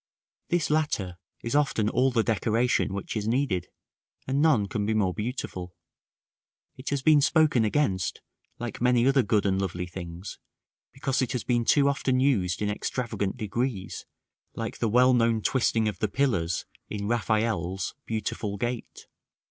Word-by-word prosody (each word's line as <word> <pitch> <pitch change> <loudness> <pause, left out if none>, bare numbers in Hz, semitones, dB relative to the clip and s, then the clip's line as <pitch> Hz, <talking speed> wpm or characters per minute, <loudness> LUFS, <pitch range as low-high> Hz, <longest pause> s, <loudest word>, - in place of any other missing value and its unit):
This 175 -4 +1
latter 105 - 0 0.2
is 115 +4 -2
often 140 -7 +2
all 130 +4 +3
the 120 -3 +1
decoration 115 0 +1
which 100 +3 -4
is 105 -1 -2
needed, 110 -8 0 0.6
and 135 +2 0
none 140 -11 +4
can 105 +1 -2
be 110 +2 0
more 95 -4 +2
beautiful; 95 -6 -5 1.0
it 130 - -6
has 140 -2 -1
been 150 -1 +6
spoken 155 -5 +4
against, 105 -6 0 0.4
like 120 -2 -6
many 125 -1 +4
other 135 0 +4
good 105 -2 +1
and 95 -1 +1
lovely 90 -2 -3
things, 90 +1 -8 0.5
because 135 0 -1
it 130 0 -1
has 125 -4 -2
been 120 -2 +1
too 140 +2 +4
often 135 -2 +1
used 105 -9 +1
in 105 - 0
extravagant 105 -2 -3
degrees, 110 -1 -3 0.5
like - - -5
the 115 - +1
well 125 +3 +5
known 115 -2 +3
twisting 115 -1 +1
of 105 - -3
the 110 - +1
pillars 95 - 0 0.2
in 100 -1 -4
Raffaelle's 110 -5 0
"Beautiful 105 -2 -3
gate." 120 +3 -4
115 Hz, 155 wpm, -27 LUFS, 100-130 Hz, 1.0 s, been